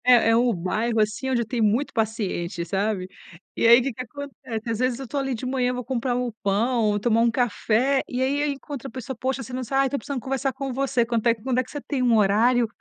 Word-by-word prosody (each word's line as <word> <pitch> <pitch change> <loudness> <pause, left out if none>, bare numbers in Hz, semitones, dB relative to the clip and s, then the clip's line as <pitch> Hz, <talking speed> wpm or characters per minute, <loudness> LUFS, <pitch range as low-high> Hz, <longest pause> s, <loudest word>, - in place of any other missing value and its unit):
É, 245 -2 +6
é 225 - +5
um 240 +1 +3
bairro 220 +6 -1
assim 215 +5 0
onde 245 -2 +2
eu - - -5
tenho 230 -1 0
muito 230 +7 +1
paciente, 200 -6 -2
sabe. 195 +1 -1 0.5
E - - +2
aí 235 +2 +8
o - - -1
que 270 +2 -2
que 250 - -6
acontece? 255 -3 -7
Às 225 - -1
vezes, 255 -1 0
eu 265 - -7
tô 290 - -5
ali 270 -2 -1
de 230 - -6
manhã, 255 -1 0
vou 250 0 -4
comprar 250 0 -1
um 250 -1 -1
pão, 210 +1 +1
tomar 230 +1 +2
um 235 - +4
café 245 +2 +1
e 250 0 -2
aí 275 +2 +1
eu 295 - +1
encontro 275 -1 -6
a - - -9
pessoa. 255 0 -6
"Poxa, 265 +1 -2
você 260 - -10
não 255 0 -3
sabe 270 +4 -3
ah, - - +2
estou 280 +1 -1
precisando 280 -2 -4
conversar 270 +2 -1
com 270 +1 -4
você. 255 -2 +1
Quanto 235 -1 -2
é 230 - +5
que 220 - -20
quando 255 0 0
é 255 - +4
que - - -16
você 290 - -5
tem 275 -2 -3
um 240 -2 +4
horário, 225 +4 +3
245 Hz, 265 wpm, -24 LUFS, 225-265 Hz, 0.5 s, aí